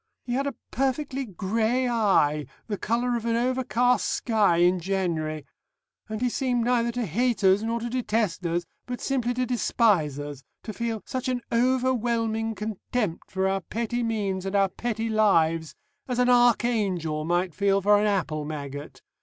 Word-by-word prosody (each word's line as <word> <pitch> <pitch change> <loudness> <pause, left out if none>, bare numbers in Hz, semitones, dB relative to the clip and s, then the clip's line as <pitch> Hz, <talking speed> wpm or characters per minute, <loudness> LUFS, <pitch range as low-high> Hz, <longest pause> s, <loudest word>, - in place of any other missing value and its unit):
He 245 - -4
had 275 +3 0
a 275 - -3 0.2
perfectly 270 0 -1
grey 220 +6 0
eye 190 -11 +2 0.2
the 210 - -3
colour 240 +2 0
of 235 - -3
an 230 - +1
overcast 245 0 +1
sky 210 -7 +2
in 180 +1 +4
January 165 -5 -2 0.6
and 215 +1 -4
he 250 - +2
seemed 245 -1 0
neither 235 -1 +2
to 245 -1 -1
hate 230 +5 0
us 190 +1 +5
nor 230 +1 -1
to 235 - -4
detest 225 -6 -1
us, 170 +1 -1 0.2
but 245 -1 -4
simply 245 -3 -1
to 255 0 0
despise 210 - +2
us, 145 -2 -6 0.2
to 215 - -6
feel 230 -1 -3
such 260 0 -3
an 250 -1 -1
overwhelming 235 -3 +1
contempt 210 -2 -3
for 190 0 0
our 195 0 0
petty 235 +5 -3
means 205 -5 -1
and 195 +1 -3
our 195 -1 +3
petty 225 +1 -3
lives, 165 -8 +2 0.3
as 250 -2 -2
an 250 0 +3
archangel 215 -10 +2
might 175 +2 0
feel 200 +2 +2
for 205 +1 +4
an 210 - +2
apple 160 -7 -1
maggot. 145 -1 -7
220 Hz, 165 wpm, -26 LUFS, 185-245 Hz, 0.6 s, us